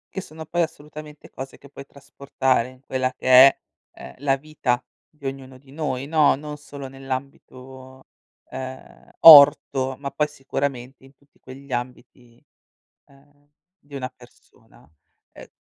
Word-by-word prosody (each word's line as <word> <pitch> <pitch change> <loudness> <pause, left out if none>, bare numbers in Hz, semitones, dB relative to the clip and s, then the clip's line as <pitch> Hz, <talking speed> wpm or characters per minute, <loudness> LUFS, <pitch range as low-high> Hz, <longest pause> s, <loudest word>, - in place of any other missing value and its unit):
Che 190 - -3
sono 160 -2 -11
poi, 175 +2 -2
assolutamente, 150 -1 -8
cose 135 0 -9
che 140 - -17
puoi 140 0 -12
trasportare 135 -3 -2
in 130 0 -19
quella 130 -1 -2
che - - -14 0.2
è, 135 - 0 0.4
ehm, - - -11
la 135 -1 +1
vita 135 -4 -2 0.3
di 150 -2 -18
ognuno 135 -1 -7
di 135 +1 -21
noi, 140 -3 -4
no, 155 -2 +3
non 150 +1 -8
solo 140 -2 -10
nell'ambito, 130 0 -9 0.5
ehm, 130 0 -10
orto, 140 -3 +7
ma 140 -1 -7
poi 150 +2 -1
sicuramente 135 -2 -5
in 135 +1 -19
tutti 140 +1 -33
quegli 135 +1 -14
ambiti, 120 -1 -7 0.7
uhm, 145 +1 -26 0.3
di 145 -4 -22
una 130 -2 -4
persona. 125 -9 -22 0.4
Uhm - - -14
135 Hz, 140 wpm, -22 LUFS, 130-145 Hz, 0.7 s, orto